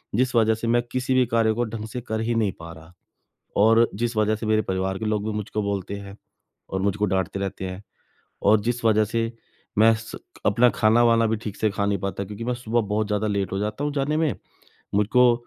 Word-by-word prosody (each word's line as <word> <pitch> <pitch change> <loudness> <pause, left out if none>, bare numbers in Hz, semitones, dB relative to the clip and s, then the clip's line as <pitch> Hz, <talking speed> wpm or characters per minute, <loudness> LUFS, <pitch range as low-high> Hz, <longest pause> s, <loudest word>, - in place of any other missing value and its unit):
जिस 130 +2 +1
वजह 110 -1 +4
से 115 +1 -4
मैं 120 +1 +3
किसी 130 0 -1
भी 130 -1 +4
कार्य 115 -1 +3
को 120 - 0
ढंग 110 -1 -6
से 125 +3 -6
कर 110 -1 -3
ही 115 +1 -1
नहीं 110 -3 +1
पा 85 0 -9
रहा। 80 +2 -15 0.7
और 115 +2 +5
जिस 115 +3 -2
वजह 110 0 +2
से 110 - -6
मेरे 110 0 +3
परिवार 95 -1 -2
के 110 - -4
लोग 105 -1 0
भी 110 - -1
मुझको 105 0 -3
बोलते 100 -1 -3
हैं 100 0 -10 0.5
और 95 - -2
मुझको 100 +1 +1
डाँटते 95 -1 -1
रहते 95 -1 -4
हैं। 95 +2 -8 0.6
और 105 +1 +5
जिस 120 +2 -2
वजह 110 -1 +4
से 115 +2 -1 0.5
मैं 110 +2 +6
स 115 - -9 0.3
अपना 120 +4 +5
खाना-वाना 115 +1 +4
भी 110 - +1
ठीक 105 -2 -7
से 110 - +1
खा 100 0 -1
नहीं 100 0 +1
पाता 100 +1 -3
क्योंकि 105 +3 -7
मैं 125 - 0
सुबह 120 -1 0
बहुत 105 0 -1
ज़्यादा 105 0 0
लेट 100 -3 -1
हो 95 - -2
जाता 105 +6 -3
हूँ 145 - 0
जाने 145 +2 0
में। 160 -5 +1 0.6
मुझको 120 +4 +4
110 Hz, 225 wpm, -24 LUFS, 100-115 Hz, 0.7 s, मैं